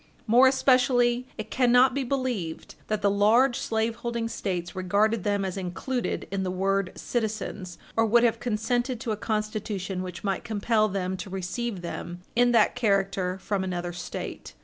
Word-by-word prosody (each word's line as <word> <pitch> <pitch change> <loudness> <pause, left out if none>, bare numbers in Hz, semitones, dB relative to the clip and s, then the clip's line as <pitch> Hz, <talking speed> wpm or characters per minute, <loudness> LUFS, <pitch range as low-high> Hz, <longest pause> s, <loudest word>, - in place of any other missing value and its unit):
More 245 +4 +6
especially, 255 -2 +3
it 215 0 -6
cannot 250 0 +5
be 275 +1 -1
believed 245 -11 -3
that 215 -1 -2
the 200 - +5
large 235 +6 +4
slaveholding 230 +1 -2
States 180 -4 -3
regarded 200 +3 +1
them 200 -1 0
as 190 0 -4
included 195 +8 -3
in 195 -1 -1
the 185 - -1
word 195 +1 0
citizens, 215 -5 -3 0.2
or 225 - +4
would 235 +2 +5
have 235 -2 +2
consented 240 +2 -1
to 230 - -2
a - - 0
Constitution 210 -3 -3
which 180 -1 -7
might 195 -2 -1
compel 215 0 +1
them 190 -2 -2
to 195 - -7
receive 190 +3 -3
them 175 +1 -6
in 245 +1 +4
that 235 - +4
character 195 -4 +1
from 195 0 -2
another 175 -1 -3
State. 175 0 -7
215 Hz, 160 wpm, -26 LUFS, 190-240 Hz, 0.2 s, More